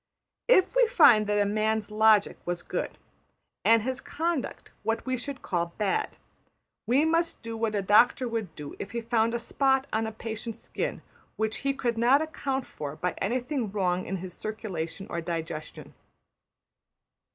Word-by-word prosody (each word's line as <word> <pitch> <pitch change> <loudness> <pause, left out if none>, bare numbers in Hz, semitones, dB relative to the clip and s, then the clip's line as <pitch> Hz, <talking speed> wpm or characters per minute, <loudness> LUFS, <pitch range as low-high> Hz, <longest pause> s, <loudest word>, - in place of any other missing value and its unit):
If 425 -3 +4
we - - +5
find 225 - +6
that 205 0 +2
a 205 - +3
man's 215 +1 0
logic 215 -1 +4
was 175 0 -3
good, - - -4 0.7
and 225 -1 +5
his 260 +2 -2
conduct 330 -3 -3
what 225 +1 -1
we 260 -1 0
should 270 +2 -6
call 170 -1 -2
bad, 205 -3 -1 0.7
we 270 +6 +4
must 330 -2 +1
do 230 0 -5
what 220 -1 -1
a 200 - 0
doctor 240 +6 +4
would 225 -6 -4
do 145 -1 -8
if 200 - -6
he 235 - -2
found 230 0 +1
a - - +2
spot 265 +3 +1
on 220 +1 +1
a - - -4
patient's 220 +1 -5
skin - - -4 0.3
which 220 0 -1
he 275 - 0
could 235 -4 -1
not 250 +4 +5
account 275 -4 -2
for 145 -1 -6
by 180 +3 -2
anything 245 +2 -1
wrong 185 -3 0
in 195 - -2
his 180 0 -7
circulation 195 -5 -5
or 170 - -3
digestion. 165 -2 -5
220 Hz, 165 wpm, -28 LUFS, 200-255 Hz, 0.7 s, find